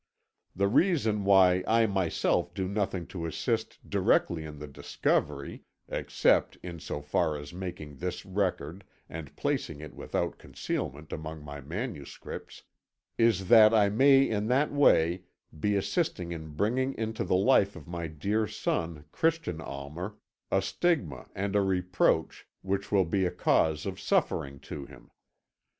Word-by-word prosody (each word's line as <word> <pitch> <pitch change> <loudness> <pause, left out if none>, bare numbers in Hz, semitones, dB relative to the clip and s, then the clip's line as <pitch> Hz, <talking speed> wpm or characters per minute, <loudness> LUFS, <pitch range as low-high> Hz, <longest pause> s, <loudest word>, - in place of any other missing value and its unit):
The 100 +2 +2
reason 110 - +2
why 95 -2 +5
I 115 +1 +4
myself 95 -5 0
do 95 -1 -1
nothing 95 -3 -2
to 85 -3 -3
assist 110 +6 -3
directly 80 -2 +2
in 75 -1 -8
the 75 - -7
discovery 70 0 -2 0.3
(except - - +1
in 85 -2 -7
so 75 - -5
far 75 +1 0
as 75 +2 -9
making 85 -6 -7
this 90 +2 -4
record 95 -3 -2 0.2
and 80 -4 -8
placing 70 - -2
it 75 0 -9
without - - -3
concealment 75 +3 -5
among 80 0 -6
my 70 0 -7
manuscripts) 80 - -7 0.6
is 110 -5 +3
that 110 -1 +8
I 105 -2 +5
may 135 +5 +5
in 105 -1 -1
that 135 +5 +2
way 90 - +4 0.3
be 105 +5 +1
assisting 100 - -1
in 80 -3 -7
bringing 130 - 0
into 110 0 -2
the - - +1
life 100 0 +4
of 80 -4 -11
my 85 -1 -4
dear 100 +8 -1
son, 80 -5 -3
Christian 160 - 0
Almer, 75 +9 -6 0.3
a 95 - +2
stigma 95 - -1
and 100 +1 -2
a 100 - +5
reproach 90 -2 +1 0.2
which 100 +1 -2
will 100 -3 +4
be 95 +2 +1
a - - 0
cause 80 -2 +2
of - - -4
suffering 70 0 0
to 70 -2 -7
him. 70 -3 -16
90 Hz, 145 wpm, -29 LUFS, 80-105 Hz, 0.6 s, that